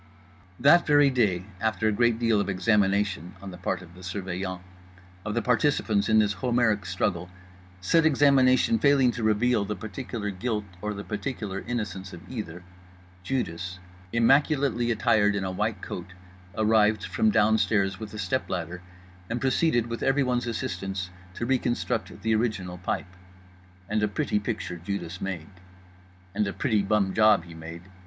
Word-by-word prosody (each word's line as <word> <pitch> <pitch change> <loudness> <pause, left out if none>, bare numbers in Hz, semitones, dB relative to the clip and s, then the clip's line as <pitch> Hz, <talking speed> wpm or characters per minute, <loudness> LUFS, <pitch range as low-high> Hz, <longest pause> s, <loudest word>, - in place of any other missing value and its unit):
That 160 +7 +5
very 145 -2 +5
day, 100 -8 +1
after 110 0 0
a - - +3
great 120 +2 +2
deal 115 -3 +2
of 100 - -3
examination 100 -2 +1
(on 100 0 -8
the 90 - -9
part 90 0 -2
of 85 -1 -15
the 90 - -14
Surveillant) 95 0 -4 0.6
of 105 0 -3
the 120 - 0
participants 110 -4 +1
in 110 - +5
this 105 -1 +3
Homeric 110 -2 +1
struggle—said 90 - -2
examination 140 - +4
failing 140 -4 +4
to 120 - -6
reveal 110 +1 +2
the 105 +1 -3
particular 110 +1 -5
guilt 105 +2 -2 0.2
or 105 0 -3
the 100 - -6
particular 105 -2 -4
innocence 100 -5 -4
of 90 +2 -11
either—Judas, 95 -1 -6 0.3
immaculately 135 0 +3
attired 110 -3 +3
in 100 - -1
a 95 - -2
white 105 +1 -2
coat, 90 0 -7 0.4
arrived 110 -1 +3
from 220 - +1
downstairs 105 - +2
with 110 -2 -7
a - - -6
step 105 +6 -2
ladder 90 0 -4 0.5
and 120 +2 -2
proceeded 130 -1 +2
with 115 0 -5
everyone's 130 -3 +1
assistance 95 -4 -3 0.2
to 120 - -3
reconstruct 125 -1 -1
the 110 0 +2
original 105 -6 -1
pipe. 90 +1 -3 0.7
And 105 0 0
a 105 - +2
pretty 105 +1 -1
picture 105 -5 -4
Judas 90 0 -5
made. 95 -2 -5 0.8
And 105 0 0
a 100 - -3
pretty 110 -6 +1
bum 100 -1 +1
job 110 -5 +5
he 85 -1 -12
made. 85 +1 -9
105 Hz, 150 wpm, -26 LUFS, 95-120 Hz, 0.8 s, That